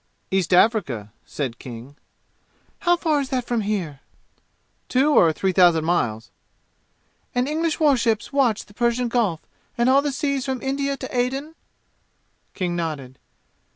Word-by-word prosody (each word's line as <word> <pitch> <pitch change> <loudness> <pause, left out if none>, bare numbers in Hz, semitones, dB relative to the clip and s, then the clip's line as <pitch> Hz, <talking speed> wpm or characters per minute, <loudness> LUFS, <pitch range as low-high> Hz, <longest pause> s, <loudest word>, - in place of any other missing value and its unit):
"East 190 -2 0
Africa," 160 - +2
said 130 -5 -4
King. 125 +3 -10 0.8
"How 350 -1 +3
far 315 -4 +1
is 270 - -5
that 255 -3 -1
from 240 -2 -1
here?" 190 -9 -3 0.9
"Two 270 +4 +3
or 170 - +5
three 190 +4 0
thousand 175 -3 +4
miles." 120 -10 -1 1.0
"And 250 +1 +1
English 315 +1 -1
war 295 -3 +5
ships 230 0 -1
watch 255 -7 +2
the 205 - -19
Persian 240 +2 0
Gulf 215 -10 0 0.4
and 235 +2 +3
all 275 +1 +5
the 290 0 -1
seas 280 -1 -1
from 260 -1 -2
India 275 +1 -2
to 260 -1 -7
Aden?" 270 +5 -1 1.0
King 180 -3 -2
nodded. 145 -6 -4
235 Hz, 145 wpm, -23 LUFS, 170-270 Hz, 1.0 s, or